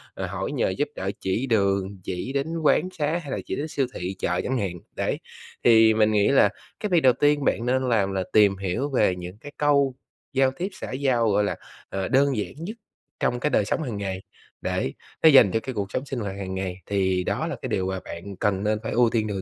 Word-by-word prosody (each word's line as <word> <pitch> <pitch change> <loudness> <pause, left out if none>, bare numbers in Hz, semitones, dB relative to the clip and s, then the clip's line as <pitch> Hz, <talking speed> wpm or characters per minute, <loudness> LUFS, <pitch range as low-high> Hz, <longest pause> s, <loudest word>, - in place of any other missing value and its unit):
à, 95 - -3
hỏi 95 +6 -4
nhờ 135 -8 +1
giúp 120 +11 -1
đỡ 95 +1 -2
chỉ 110 +8 -1
đường, 100 -3 +1
chỉ 95 +9 -4
đến 140 +2 0 0.2
quán 180 +4 +3
xá 150 +3 +1
hay 140 - -7
là - - -1
chỉ - - -3
đến 150 +3 -3
siêu 135 -4 -1
thị, 90 +2 -4
chợ, 90 0 0
chẳng 130 - -1
hạn, 95 -6 -3 0.2
đấy. - - -1 0.4
Thì 110 -1 +6
mình 110 0 +3
nghĩ 105 -1 +3
là 135 -7 +5 0.3
cái 210 - -2
việc 175 -3 +4
đầu 130 -3 +6
tiên 145 +1 +2
bạn 115 - +1
nên 130 +1 +1
làm 100 -4 +2
là 95 -1 0
tìm 100 -2 +5
hiểu 100 +9 -2
về 125 -9 +2
những 90 +2 -8
cái 145 +5 -10
câu 140 -3 +3 0.4
giao 135 0 +3
tiếp 185 +3 -2
xã - - -7
giao, 130 -4 +1
gọi 105 +1 +3
là, 100 - -1 0.3
ờ, 95 -1 -2
đơn 135 -2 +3
giản 105 - -3
nhất 190 +9 -6 0.4
trong 120 - 0
cái 150 - 0
đời 105 - +2
sống 160 - -1
hàng 120 -7 -4
ngày, 95 -2 -3 0.4
để 65 - -1 0.3
nó 160 - +9
dành 125 -9 +7
cho 115 - +1
cái 130 +3 -6
cuộc 100 -1 -3
sống 135 - -2
sinh 135 -2 -4
hoạt 100 -3 -4
hàng 95 -1 -4
ngày, 95 -1 -3
thì 95 -2 +1
đó - - -1
là - - -3
cái - - -4
điều 95 0 0
mà 95 0 -2
bạn 95 +4 -7
cần 100 0 0
nên 105 0 +1
phải - - -3
ưu 120 0 +4
tiên 110 -2 0
đầu 100 -2 -3
110 Hz, 245 wpm, -25 LUFS, 95-135 Hz, 0.4 s, nó